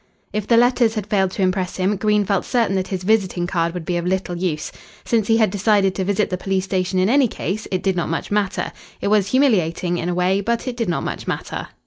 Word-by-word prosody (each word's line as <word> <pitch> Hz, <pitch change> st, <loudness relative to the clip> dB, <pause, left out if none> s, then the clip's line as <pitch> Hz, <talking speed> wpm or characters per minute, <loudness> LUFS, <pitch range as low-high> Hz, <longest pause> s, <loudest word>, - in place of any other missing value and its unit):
If 210 Hz, -1 st, -2 dB
the 230 Hz, -, +4 dB
letters 240 Hz, -1 st, +3 dB
had 210 Hz, -3 st, -2 dB
failed 195 Hz, -2 st, +1 dB
to 195 Hz, -, -1 dB
impress 185 Hz, -1 st, 0 dB
him, 190 Hz, +2 st, +1 dB
Green 210 Hz, +1 st, +1 dB
felt 195 Hz, -1 st, 0 dB
certain 230 Hz, -6 st, +1 dB
that 190 Hz, -1 st, -1 dB
his 185 Hz, -2 st, -4 dB
visiting 190 Hz, -4 st, +1 dB
card 170 Hz, -1 st, -1 dB
would 175 Hz, -3 st, -5 dB
be 175 Hz, -1 st, -1 dB
of 170 Hz, -, -3 dB
little 185 Hz, -1 st, -1 dB
use. 170 Hz, -4 st, -2 dB, 0.3 s
Since 225 Hz, -3 st, +1 dB
he 225 Hz, -, +4 dB
had 220 Hz, -4 st, +3 dB
decided 200 Hz, -1 st, +2 dB
to 190 Hz, -, -2 dB
visit 205 Hz, +1 st, 0 dB
the 185 Hz, -, -1 dB
police 190 Hz, -1 st, -1 dB
station 185 Hz, -1 st, -1 dB
in 185 Hz, +1 st, +3 dB
any 265 Hz, +3 st, +4 dB
case, 215 Hz, -1 st, -4 dB
it 185 Hz, -1 st, -2 dB
did 190 Hz, -2 st, +1 dB
not 170 Hz, -, -1 dB
much 165 Hz, -, -3 dB
matter. 205 Hz, -2 st, 0 dB, 0.3 s
It -, -, -1 dB
was 205 Hz, -2 st, +3 dB
humiliating, 180 Hz, -, +1 dB
in 170 Hz, -, -2 dB
a 175 Hz, -, -1 dB
way, 185 Hz, +2 st, +2 dB
but 235 Hz, +5 st, -1 dB
it 250 Hz, -, -2 dB
did 230 Hz, -5 st, -2 dB
not 175 Hz, -, -1 dB
much -, -, -5 dB
matter. -, -, -4 dB
195 Hz, 250 wpm, -21 LUFS, 185-215 Hz, 0.3 s, the